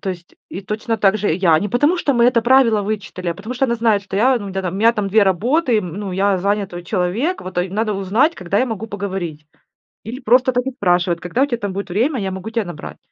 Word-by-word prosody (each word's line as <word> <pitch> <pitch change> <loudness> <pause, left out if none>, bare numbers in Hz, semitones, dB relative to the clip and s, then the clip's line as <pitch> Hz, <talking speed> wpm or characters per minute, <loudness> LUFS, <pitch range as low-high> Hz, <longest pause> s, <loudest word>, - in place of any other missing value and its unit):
То 195 - -3
есть, 175 -1 -10
и 190 - -6
точно 220 +3 -3
так 205 0 +2
же 205 -4 0
я. 170 -4 +3
Не 205 - -2
потому 290 - +2
что 285 -5 0
мы 235 -1 +3
это 240 -1 +4
правило 235 -3 +4
вычитали, 195 -3 -4
а 170 - -1
потому 215 +6 -7
что 265 +2 +1
она 235 - 0
знает, 225 -3 +1
что 195 -1 -6
я, 250 +4 +3
ну, 200 -3 -7
тя 190 0 -3
там, 180 -1 -3
у - - -4
меня 225 +3 +4
там 210 -3 -2
2 215 +2 +4
работы, 235 - +2
м 180 -5 -5
ну, 200 -1 -5
я 195 +1 +1
занятой 195 -2 -2
человек, 205 - -1
вот 185 -1 -5
это 180 - +3
й - - -7
надо 215 +3 -1
узнать, 210 - +1
когда 185 +2 -2
я 255 - +2
могу 225 -2 -5
поговорить. 190 -7 -5 0.6
Или 235 +5 -7
просто 250 +1 +3
так 250 0 -1
и 265 - -2
спрашивает: 180 -7 +1
"Когда 180 +9 -2
у - - +4
тебя 250 -4 -2
там 205 -4 -4
будет 200 0 -5
время, 240 - 0
я 195 -2 -3
могу 190 +4 -6
тя 230 -1 0
набрать?" 175 -4 -8
205 Hz, 265 wpm, -19 LUFS, 185-235 Hz, 0.6 s, это